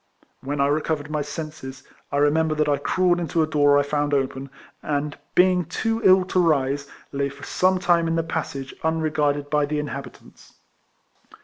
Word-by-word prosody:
Wh^n 140 +2 -3
I 140 - +4
recovered 150 +1 -1
my 150 -1 -1
senses, 150 -3 -7 0.3
I 140 - -1
remember 155 +2 +2
that 150 0 +1
I 145 -1 +2
crawled 180 +1 +1
into 165 -1 0
a - - +2
door 145 -2 +3
1 145 - +4
found 145 0 0
open, 135 0 -2 0.3
and, 145 0 -2 0.2
being 180 0 +4
too 225 +8 -2
ill 190 -1 +6
to 185 - 0
rise, 140 -4 +1 0.2
lay 140 0 -1
for 140 - -13
some 185 0 +1
time 175 -2 +2
in 165 - 0
the 165 - +1
passage 140 -4 -4
unregarded 150 -3 0
by 150 -1 +2
the 150 +1 -2
inhabitants. 140 -3 -8
150 Hz, 175 wpm, -23 LUFS, 145-165 Hz, 0.3 s, ill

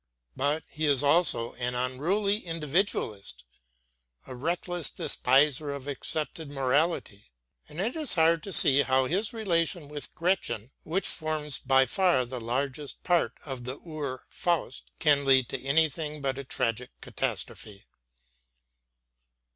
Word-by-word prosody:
But 145 +3 0
he 155 0 -2
is 140 -1 +5
also 145 -6 +3
an 125 0 -1
unruly 165 +12 0
individualist, 150 - -2 0.8
a - - -9
reckless 170 +4 -2
despiser 145 +3 +2
of 140 -1 -6
accepted 155 +2 -4
morality; 135 - -1 0.4
and 150 - -9
it 220 +6 -1
is 310 -5 0
hard 165 -1 +3
to 195 - -8
see 140 -4 +8
how 130 -1 +2
his 195 - -1
relation 175 - -1
with 145 -1 -6
Gretchen, 135 - -1
which 180 +5 -2
forms 155 -3 -2
by 135 0 +3
far 175 -7 +2
the 125 0 -6
largest 135 +4 -3
part 175 -2 +1
of 135 -4 -6
the 130 +3 -5
Ur 150 -6 -6
Faust, 170 -6 -2
can 145 -3 +3
lead 130 -2 +4
to 135 - -5
anything 150 +1 0
but 135 -1 -2
a - - -5
tragic 120 -1 -2
catastrophe. 100 -2 -5
145 Hz, 130 wpm, -28 LUFS, 130-165 Hz, 0.8 s, see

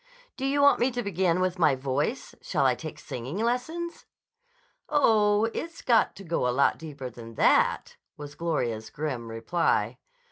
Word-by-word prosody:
"Do 270 - -2
you 285 +1 +2
want 285 - +6
me 245 - +3
to 245 0 -2
begin 185 -3 +1
with 185 0 -1
my 150 -5 +4
voice? 135 +2 -2
Shall - - 0
I - - +4
take - - -7
singing 130 +8 -6
lessons?" 255 +10 -2 0.8
"Oh, 215 -7 +4
it's 335 0 -6
got 235 -3 +3
to 195 - -10
go 165 -7 -1
a - - +2
lot 130 +3 +2
deeper 145 -5 -7
than 115 -1 -11
that," - - +2 0.2
was 145 -1 -8
Gloria's 120 -10 -2
grim 130 -4 -4
reply. 115 +10 0
170 Hz, 165 wpm, -27 LUFS, -, 0.8 s, want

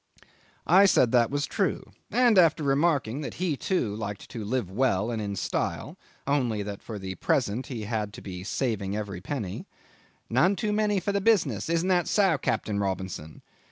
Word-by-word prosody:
'I 190 +4 +6
said 125 -10 +4
that 120 -2 +4
was 145 +1 -1
true, - - -2 0.2
and 240 -5 +4
after 165 -3 +4
remarking 140 -3 +1
that 145 - -6
he 180 -4 -1
too 125 - -1
liked 105 -2 -6
to 115 - -5
live 110 -3 -2
well 115 -1 +1
and 115 -2 -2
in 100 -1 -3
style, - - -2 0.3
only 125 -7 0
that, 100 -1 -6
for 110 - -7
the 95 -1 -5
present, 105 +6 0
he 120 -6 -5
had 105 -1 -2
to - - -9
be 90 -2 -7
saving 105 -3 -2
of 105 - -1
every 95 -4 -7
penny 105 -6 -5 0.6
"none 170 - +3
too 215 0 -1
many 210 -1 +2
for 190 +3 -2
the 200 0 0
business! 210 -6 +2
Isn't 170 +2 +1
that 175 -2 +2
so, 190 -8 +3
Captain 105 -2 -1
Robinson?" 95 -5 -4
120 Hz, 185 wpm, -27 LUFS, 100-170 Hz, 0.6 s, I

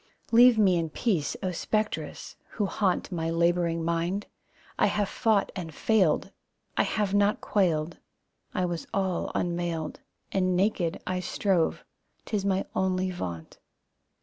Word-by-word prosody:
Leave 240 0 +7
me 190 -4 +4
in 165 -1 -1
peace, 165 -4 -1
O 185 - 0
Spectres, 215 +5 -2 0.2
who 210 - 0
haunt 195 -1 0
My 165 -2 -2
labouring 170 0 +1
mind, 170 +4 -1 0.5
I - - +5
have 205 -1 0
fought 215 -1 +1
and 165 -5 -6
failed. 195 -9 +2 0.4
I - - +3
have 205 -2 0
not 205 +1 +3
quailed, 170 -5 0 0.5
I 185 - 0
was 175 -2 -4
all 190 -3 0
unmailed 170 -3 -2 0.3
And 185 -1 +1
naked 185 -3 +1
I 185 0 -1
strove, 180 -2 0 0.4
'tis 205 -3 -1
my 195 -1 +1
only 185 0 +1
vaunt. 85 - -6
185 Hz, 135 wpm, -27 LUFS, 170-200 Hz, 0.5 s, Leave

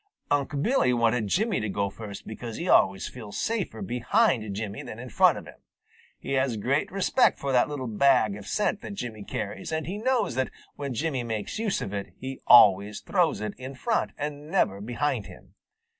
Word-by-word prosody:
Unc' 145 0 0
Billy 235 - +3
wanted 115 -2 +2
Jimmy 210 - +1
to 110 - -2
go 100 0 -1
first 100 -1 -9
because 115 +1 -7
he 170 - -4
always 95 - +4
feels 110 -5 -8
safer 220 -2 -2
behind 125 - +1
Jimmy 105 -1 -4
than 110 - -8
in 125 +2 -8
front - - +5
of - - -8
him. - - -14 0.6
He - - -7
has 130 -4 +1
great 135 +8 0
respect 195 +6 +3
for 140 - -3
that 125 +2 +3
little 145 -3 -4
bag 115 -2 +3
of 105 -1 -10
scent 210 -1 0
that 200 - -7
Jimmy 110 - -6
carries, 105 +6 -5
and 160 0 -2
he 195 +5 -4
knows 255 - +1
that 130 +1 0 0.3
when 140 -3 -4
Jimmy 140 -2 -1
makes 110 - -4
use 220 -3 -1
of 100 - -6
it, 100 -1 -5
he 130 0 -7
always 105 -3 +6
throws 175 - +1
it 105 -1 -3
in 130 +1 -7
front 225 - 0
and 145 +1 -5
never 105 - +1
behind 120 +7 -2
him. - - -15
125 Hz, 195 wpm, -27 LUFS, 110-160 Hz, 0.6 s, always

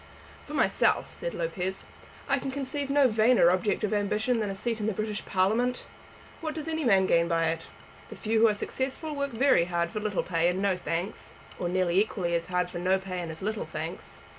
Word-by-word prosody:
"For - - -7
myself," - - +2
said - - -4
Lopez, 190 - -3 0.4
"I 275 - +2
can 270 - -4
conceive 280 +1 -3
no 280 -1 +5
vainer 220 -5 +5
object 185 +4 0
of 215 - 0
ambition 215 +4 +1
than 210 -2 -1
a 195 - -4
seat 230 +3 -2
in 210 - -1
the 220 - 0
British 215 0 -3
Parliament. 225 +7 +1 0.5
What 315 -1 -4
does 315 -1 -5
any 320 -1 -1
man 195 -6 +4
gain 170 -2 +3
by 165 -1 +2
it? 165 0 -4 0.4
The - - -8
few 220 +1 0
who 225 - +7
are 210 - +2
successful 270 +7 -3
work 280 0 -1
very 240 -7 +3
hard 170 -1 -1
for 215 - -3
little 210 -2 -1
pay 170 -1 +1
and 180 +1 0
no 195 -1 +2
thanks, 180 +2 -4 0.2
or 175 - -1
nearly 185 0 +2
equally 185 -5 -1
hard 180 +1 -2
for 175 - -5
no 185 +2 +2
pay 190 -1 -5
and 170 -2 -4
as 160 +3 -8
little 215 +2 -2
thanks. - - -6
205 Hz, 215 wpm, -28 LUFS, 180-250 Hz, 0.5 s, who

